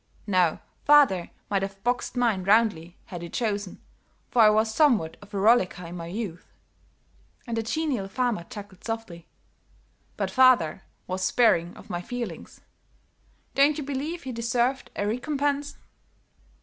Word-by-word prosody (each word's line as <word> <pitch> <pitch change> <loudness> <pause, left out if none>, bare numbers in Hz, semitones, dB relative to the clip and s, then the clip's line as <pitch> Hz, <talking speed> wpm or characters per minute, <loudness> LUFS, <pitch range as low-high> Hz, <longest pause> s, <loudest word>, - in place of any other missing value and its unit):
Now, 180 -5 +2 0.2
father 280 -12 +5 0.2
might 200 -2 0
have 195 0 -6
boxed 245 +1 -1
mine 230 -6 +1
roundly, 195 -5 +2
had 175 -2 -8
he 170 - -7
chosen, 205 -4 -3 0.5
for 240 - +4
I 215 - +8
was 220 +1 +2
somewhat 225 - +3
of 205 0 -15
a 205 - -4
rollicker 195 -4 +3
in 170 +1 -8
my 165 -1 -6
youth," 185 -2 -6 0.9
and 235 -3 -3
the 225 - 0
genial 255 -4 -2
farmer 235 -3 -1
chuckled 205 -5 -11
softly, 225 -7 -6 0.9
"but - - -2
father 255 - +4 0.2
was 185 +1 -4
sparing 185 -5 +2
of - - -12
my 175 0 -2
feelings. 245 +5 -7 0.9
Don't 285 +2 +4
you 300 - -3
believe 285 +5 -4
he 260 - -5
deserved 240 +3 -1
a 205 - -1
recompense?" 285 +5 -1
220 Hz, 145 wpm, -26 LUFS, 185-250 Hz, 0.9 s, I